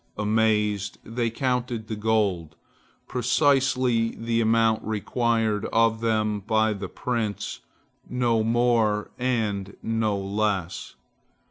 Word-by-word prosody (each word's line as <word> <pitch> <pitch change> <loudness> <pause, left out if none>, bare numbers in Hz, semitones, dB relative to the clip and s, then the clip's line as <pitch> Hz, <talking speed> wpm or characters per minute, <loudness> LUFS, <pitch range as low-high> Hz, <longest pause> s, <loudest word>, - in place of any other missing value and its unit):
Amazed, 105 -1 +1
they 115 0 -2
counted 125 -2 -2
the 110 - -3
gold, 105 -7 0 0.5
precisely 125 -2 +2
the 115 0 0
amount 115 0 +2
required 110 0 0
of 115 0 +2
them 110 -2 +1
by 110 +2 +1
the 100 -2 -6
prince, 115 -4 -3 0.5
no 120 -3 +1
more 115 -2 +1
and 105 -6 -1
no 110 -2 0
less. 100 -2 -2
110 Hz, 100 wpm, -25 LUFS, 105-115 Hz, 0.5 s, precisely